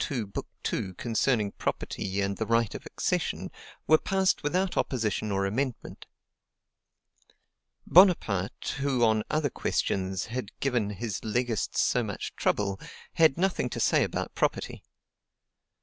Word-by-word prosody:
II., 125 -5 -1
Book 100 -1 -6 0.2
2, 95 -1 -2
concerning 115 -2 +1
property 95 +1 -3
and 100 0 -1
the 110 - -2
right 115 -1 +2
of - - -8
accession, - - -2 0.3
were 155 - +5
passed 190 -1 +1
without 180 +5 0
opposition 110 -4 -1
or 100 0 +1
amendment. 125 +5 -3 1.8
Bonaparte, 150 - +3
who 135 -3 +1
on 110 -1 +3
other 150 -3 0
questions 95 -1 -1
had 120 -2 -6
given 120 -6 0
his 105 -1 -4
legists 115 -1 -1
so - - +2
much - - -5
trouble, 100 -1 0 0.3
had 160 -4 +4
nothing 180 -8 0
to - - -5
say - - +3
about - - -3
property. - - -1
115 Hz, 130 wpm, -28 LUFS, 100-140 Hz, 1.8 s, were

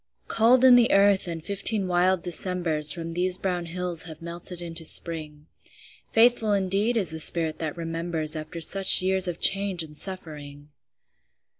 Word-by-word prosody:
Cold 240 +3 +2
in 255 - +6
the 245 -1 +3
earth, 195 -1 +2
and 165 -2 -7
fifteen 200 0 -2
wild 180 0 0
Decembers 170 -4 +1
From 165 +1 -8
these 180 +1 0
brown 180 -3 -4
hills 180 -1 -5
have 160 -3 -12
melted 170 +1 -6
into 165 -1 -5
Spring. 155 -2 -2 0.7
Faithful 225 -2 +1
indeed 200 +4 -1
is 190 -7 -2
the 160 - -6
spirit 160 0 -1
that 160 0 -6
remembers 165 -1 -3
After 155 +2 -9
such 190 +2 +7
years 190 0 0
of 175 -1 -6
change 195 -3 +2
and 150 -1 -14
suffering! 150 -5 -7
175 Hz, 155 wpm, -23 LUFS, 165-195 Hz, 0.7 s, such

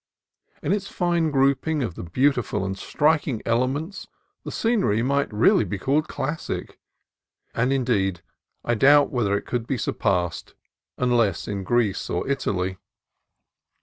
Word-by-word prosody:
In - - +1
its 200 -1 -2
fine 170 -3 0
grouping 140 +2 +1
of 110 - -3
the - - -8
beautiful 120 - 0
and 95 0 -3
striking 150 +2 +1
elements 130 - -1 0.4
the - - -6
scenery 195 - +1
might 140 +1 0
really 105 +1 +4
be 100 0 -4
called 140 +9 0
classic; 145 +4 -4 0.7
and, 125 +3 +1
indeed, 100 -9 0 0.4
I 120 - +1
doubt 145 +5 +5
whether 105 -6 +1
it - - -7
could 120 -2 -3
be 135 - -1
surpassed, 90 -7 -1 0.4
unless 120 -7 +1
in 100 -2 -3
Greece 105 -1 0
or 85 - -2
Italy. 95 -9 -1
125 Hz, 135 wpm, -24 LUFS, 100-145 Hz, 0.7 s, doubt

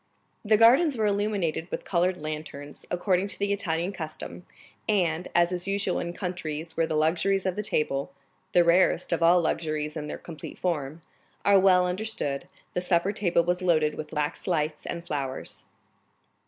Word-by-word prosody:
The 215 0 +4
gardens 255 +6 +5
were 220 - +1
illuminated 200 -5 0
with - - -5
colored 180 -2 0
lanterns, 150 -2 -7
according 185 +1 +1
to 200 - -3
the 200 0 0
Italian 175 -2 -1
custom, 160 0 -7 0.4
and, 180 -4 +1
as 175 0 +4
is 180 +1 -2
usual 200 -2 0
in 170 - -3
countries 165 -3 -5
where 165 -1 +1
the 160 - -2
luxuries 175 +5 +2
of 185 -1 0
the 210 - -1
table—the 140 -1 -1
rarest 175 0 +3
of 170 - 0
all 170 +2 +6
luxuries 155 -2 -1
in 150 -2 -4
their - - -5
complete 160 -4 -9
form—are 165 +4 -1
well 185 -1 +5
understood, 180 -6 -3 0.3
the 180 - -1
supper 180 +1 +2
table 175 -5 +2
was 175 +1 0
loaded 155 -4 +2
with 155 -1 -7
wax 150 +3 -2
lights 155 -3 -1
and 170 0 -5
flowers. 135 -4 -4
175 Hz, 160 wpm, -27 LUFS, 155-190 Hz, 0.4 s, all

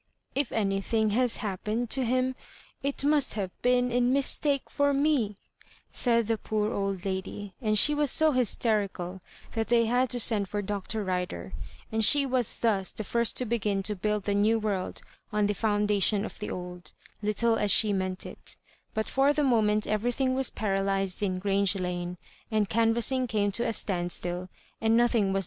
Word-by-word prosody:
If 280 -2 -1
anything 210 +1 0
has 245 +2 +2
happened 215 +4 -3
to 265 - +2
him 255 +2 0 0.5
it 280 0 -2
must 290 -4 +2
have 195 -4 -3
been 250 0 +2
in 245 +1 +2
mistake 280 +1 +2
for 285 -1 +1
me," 275 -8 +1 0.6
said 235 -2 +3
the 225 0 -1
poor 215 +1 -2
old 195 -2 -3
lady, 195 +1 -5
and 215 -3 +1
she 295 +8 +4
was 295 -1 +2
so 315 +3 +4
hysterical 205 -7 0 0.3
that 225 -1 -2
they 235 -1 +3
had 245 +2 +1
to 245 - 0
send 205 -4 +3
for 205 0 -3
Dr. 205 +2 -3
Rider, 185 0 -4 0.4
and 220 0 +1
she 280 +6 +6
was 255 -4 0
thus 200 -5 +1
the 215 - -5
first 235 +2 0
to 250 - +1
begin 210 -4 -1
to 210 +1 0
build 210 +1 -2
the 205 - -1
new 210 +3 +3
world 205 -4 -3 0.3
on 210 0 +1
the 205 - +1
foundation 210 0 +1
of - - -9
the 210 - -5
old, 180 0 -7 0.3
little 225 +2 +1
as 205 - 0
she 210 0 +5
meant 185 -1 -2
it - - -8 0.4
But 220 0 0
for 275 +2 +2
the 300 0 0
moment 215 -5 +2
everything 245 +5 0
was 265 -1 +2
paralysed 195 -2 -1
in 185 -3 -1
Grange 195 0 +1
Lane, 180 -1 -4 0.3
and 215 -2 +1
canvassing 235 +4 +2
came 205 -3 0
to 235 +5 -1
a - - 0
standstill, 175 -2 -2 0.3
and 225 0 +3
nothing 235 -4 +2
was 195 - 0
215 Hz, 175 wpm, -27 LUFS, 195-245 Hz, 0.6 s, she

